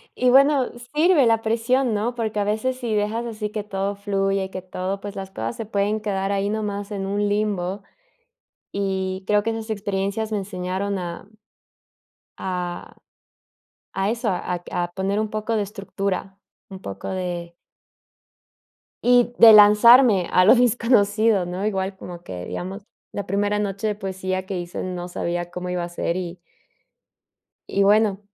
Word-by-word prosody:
Y 250 - +2
bueno, 275 0 +5 0.2
sirve 310 -2 +4
la 225 -1 +3
presión, 230 +3 +1
¿no? 215 +4 -1
Porque 220 -3 -2
a - - +2
veces 220 +5 -1
si 240 -4 -3
dejas 215 +3 -1
así 215 -2 -4
que 210 -1 -3
todo 200 0 -3
fluye, 195 -1 -1
que 185 - -6
todo, 185 +1 -4
pues 205 0 -7
las 195 -1 -6
cosas 115 -7 -4
se 225 - -5
pueden 205 +1 -1
quedar 195 -2 -1
ahí 200 0 0
nomás 205 -1 -3
en 195 -2 -3
un 205 +1 0
limbo, 200 -2 -1 0.9
y 190 -1 -2
creo 210 0 +3
que 225 - 0
esas 225 0 -5
experiencias 200 +1 -2
me 210 - +1
enseñaron 190 0 -3
a 175 +1 -6 1.1
a 180 -2 -4 1.1
a - - 0
eso, 235 +1 -2
ac 180 -1 -3
a 175 -1 -2
poner 195 +2 -1
un 215 - -2
poco 215 +1 -2
de 210 - +1
estructura, 195 -1 -4 0.3
un 190 -1 -9
poco 100 - -7
de 175 -2 -4 1.5
Y 245 0 +4
de 225 -1 +10
lanzarme 210 -1 +7
a 185 - +5
lo 215 +7 +7
desconocido, 225 -4 +3
¿no? 180 +3 -4
Igual, 190 -2 -1
como 175 -2 -9
que, 90 -1 -7
digamos, 190 +2 -6 0.3
la 200 - -4
primera 205 +2 0
noche 200 0 -2
de 210 - -1
poesía 190 -2 -3
que 190 -1 -4
hice 175 0 -5
no 180 -1 -4
sabía 175 0 -3
cómo 180 0 -5
iba 180 -1 -2
a - - -8
ser, 175 0 -2
y 180 -1 -5 1.3
y 200 - +2
bueno. 205 -1 +3
200 Hz, 160 wpm, -23 LUFS, 185-215 Hz, 1.5 s, de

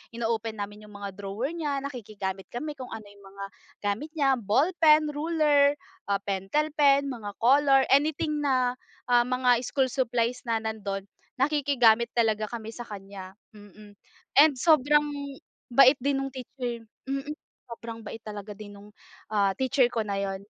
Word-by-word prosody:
ino-open 225 -1 -2
namin 205 +1 -6
yung 210 - -15
mga 200 -1 -6
drawer 205 +6 -3
niya, 290 -4 -1
nakikigamit 205 -8 -5
kami 300 +5 -4
kung 255 -2 -8
ano 220 - -7
yung 200 -1 -18
mga 200 0 -7 0.4
gamit 205 +9 -2
niya 270 -3 +3
ballpen, 305 - +3
ruler, 295 -2 +3 0.4
ah, 200 0 +1
pentel 200 +11 -1
pen, 280 -1 +4
mga 220 -6 -6
color, 270 +3 +5
anything 300 +2 +2
na, 255 -2 +2 0.3
ah, 240 -1 +5
mga 250 -1 +3
school 265 +1 0
supplies 245 -1 -1
na 230 -1 +1
nandun. 200 -3 -4 0.3
Nakikigamit 260 -5 +3
talaga 220 -2 +1
kami 225 -2 -6
sa 240 - -6
kanya, 195 -2 -9 0.2
mm. 205 0 -15 0.5
And 300 0 +7
sobrang 295 0 +4 0.7
bait 265 +2 +7
din 280 +2 0
nung 270 0 -4
teacher 245 -2 -6 0.2
mm, 275 +1 -3 0.4
sobrang 230 -1 -8
bait 225 +1 -8
talaga 210 -1 -7
din 205 0 -10
nung, 205 +1 -14 0.4
ah, 200 -2 +2
teacher 265 -1 +3
ko 230 - -2
na 200 -1 -2
yun. 195 -1 -3
240 Hz, 150 wpm, -27 LUFS, 210-280 Hz, 0.7 s, And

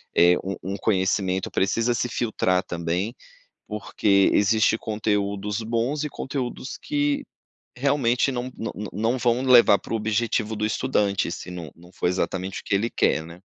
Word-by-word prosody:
eh, 90 +1 +6
um 95 +1 -3 0.2
um - - -2
conhecimento, 95 -2 0
precisa 115 +5 +1
se 120 +1 -1
filtrar 95 -6 0
também, 90 +6 -2 0.5
porque 100 -2 +2
existe 110 +2 +3
conteúdos 105 -1 -1
bons 120 +7 -1
e - - -2
conteúdos 130 -2 -5
que 145 -1 0 0.5
realmente 130 -1 +2
não 125 0 -4
não 115 - -4
não 105 -1 -6
não 115 +6 0
vão 120 0 +1
levar 125 -5 +7
para - - -9
o 115 - +2
objetivo 110 0 0
do 105 0 -2
estudante, 105 -5 0
se 90 - -7
não 85 -3 -7
não 85 +1 -17
for - - -2
exatamente 95 +1 -2
o - - -19
que 100 - 0
ele 110 +4 +1
quer, 80 - +1
né. 85 +2 -12
105 Hz, 165 wpm, -24 LUFS, 95-120 Hz, 0.5 s, levar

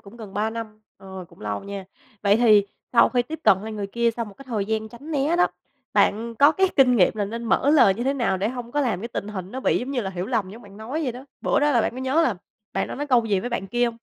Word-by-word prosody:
cũng 200 +3 -14
gần 210 -4 -10
3 215 +2 0
năm, 220 -2 -7 0.2
ờ, 190 -1 -9
cũng 170 - -20
lâu 105 - -4
nha. 200 -1 -6 0.4
Vậy 200 0 +4
thì 215 -4 +5 0.3
sau 235 - +6
khi 245 -1 +1
tiếp 315 +5 -7
cận 200 -4 +6
lại 220 - -6
người 205 -2 -4
kia 235 +4 +1
sau 235 - -2
một 205 -2 -12
cái 275 - -13
thời 210 -4 -1
gian 220 +1 -2
tránh 260 +7 -11
né 300 +2 +1
đó, 355 - +5 0.5
bạn 230 +3 +2
có 285 +6 +6
cái 380 +3 +2
kinh 250 -3 +5
nghiệm 185 -5 +4
là 205 - 0
nên 230 +4 -5
mở 270 +5 +2
lời 265 -11 +6
như 240 +5 -4
thế 275 - +1
nào 240 -7 0
để 200 +4 -1
hông 245 -1 -7
có 295 - +1
làm 225 -10 0
cái 230 - -5
tình 210 -3 -5
hình 190 -3 -6
nó 260 - -4
bị, - - +2
giống 255 +3 -5
như 260 - -1
là, 195 -4 -4
hiểu 180 0 -4
lầm 220 -6 -1
giống 230 +4 -11
bạn 200 0 -14
nói 255 +9 -4
vậy 255 -5 -1
đó? 250 +2 -10 0.2
Bữa - - +1
đó 295 0 +3
là 240 - +3
bạn - - 0
có 255 - -8
nhớ 265 +5 +2
là 245 -10 +1 0.4
bạn - - -1
đã - - -5
nói 290 +2 -4
câu 245 -4 +3
gì 200 -4 +1
với 245 - -4
bạn 215 -5 -3
kia 240 +5 +1
hông? 235 - 0
230 Hz, 310 wpm, -24 LUFS, 200-255 Hz, 0.5 s, sau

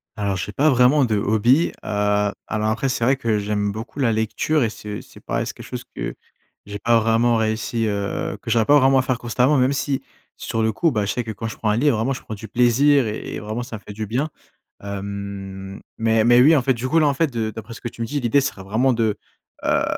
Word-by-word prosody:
Alors 100 -3 -1
j'ai 95 +3 -4
pas 145 +8 +3
vraiment 130 +2 +4
de 110 -3 0
hobby, 110 - +3
heu, 105 0 +1 0.2
alors 110 0 -1
après, 120 +5 0
c'est 125 -2 -1
vrai 130 +4 +4
que 115 -4 0
j'aime 105 0 -1
beaucoup 110 +6 -8
la 125 -4 +2
lecture 110 +7 0
et 115 - +1
c'est 105 -1 -7
c'est - - -16
pareil, - - -2
c'est - - -5
quelque - - -11
chose - - -6
que - - -4 0.5
j'ai 105 0 -7
pas 115 +3 +3
vraiment 115 +1 +2
réussi, 110 +1 -1
heu, 100 -1 -2
que - - -7
j'arrive 115 -2 +3
pas 145 +3 +6
vraiment 135 0 +4
à - - +5
faire 130 -2 -1
constamment. 125 +5 +2
Même 130 +2 +3
si 140 0 -1 0.3
sur 115 - -2
le 110 - +2
coup, 160 +9 +1
bah 105 -5 0
je 100 - -1
sais 125 - -2
que 115 - -5
quand 115 +2 -5
je 110 - -6
prends 110 - -1
un 105 - +2
livre 145 0 +3
vraiment 120 +5 0
je - - -7
prends - - -8
du 110 +1 -8
plaisir 125 +5 +4
et 105 - -5
et - - -4
vraiment 110 +3 -4
ça 120 -2 -7
me - - -16
fait 105 - -8
du 110 +1 -5
bien. 130 +9 -1 0.5
Hem, 100 -1 -6 0.2
mais 115 -1 +2
mais 120 +1 +6
oui 155 +5 +7
en 140 - +3
fait, 130 +1 +2
du 120 +2 -4
coup 160 +4 +3
là, 155 - +4
en 145 - +2
fait 160 +3 +1
de 115 -4 -2
d'après 110 +1 -9
ce - - -11
que 120 - -4
tu 115 - -7
me - - -1
dis, 145 +4 -2
l'idée 125 +3 +3
ce 140 - +1
serait 95 - -10
vraiment 110 +7 +1
de 110 -3 0 0.5
heu, - - +2
115 Hz, 260 wpm, -22 LUFS, 105-130 Hz, 0.5 s, oui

